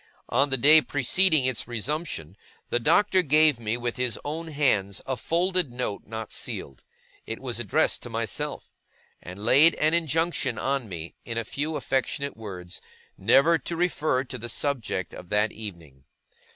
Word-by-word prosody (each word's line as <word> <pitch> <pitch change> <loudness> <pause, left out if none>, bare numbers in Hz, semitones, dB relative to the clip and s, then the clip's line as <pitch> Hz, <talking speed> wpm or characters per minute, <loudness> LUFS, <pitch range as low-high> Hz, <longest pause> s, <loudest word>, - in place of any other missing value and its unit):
On 140 +1 +2
the 135 - +1
day 150 +5 +7
preceding 150 +2 +2
its 130 -4 -1
resumption, 120 - -3 0.4
the 120 - +2
Doctor 190 - +3
gave 155 -4 +4
me 115 0 -2
with 120 -1 -3
his 125 -2 -1
own 160 +3 -4
hands 120 -10 +1
a 130 - -1
folded 175 +1 0
note 120 -4 -4
not 110 0 -6
sealed. 65 - -5 0.5
It - - -5
was - - -3
addressed - - +1
to - - -8
myself; - - -4 0.5
and 95 +4 -9
laid 145 +8 +6
an 155 +1 +2
injunction 165 +1 0
on 135 -5 -1
me, 85 -2 -7
in 115 -1 -5
a 115 - -2
few 150 +7 -3
affectionate 140 +2 -1
words, 90 -5 -8 0.3
never 140 - +4
to 170 +5 -5
refer 155 -6 +1
to 125 -1 -7
the 120 +1 -6
subject 115 - -2
of 90 - -10
that 105 +1 +2
evening. 85 -11 -10
130 Hz, 160 wpm, -26 LUFS, 110-155 Hz, 0.5 s, day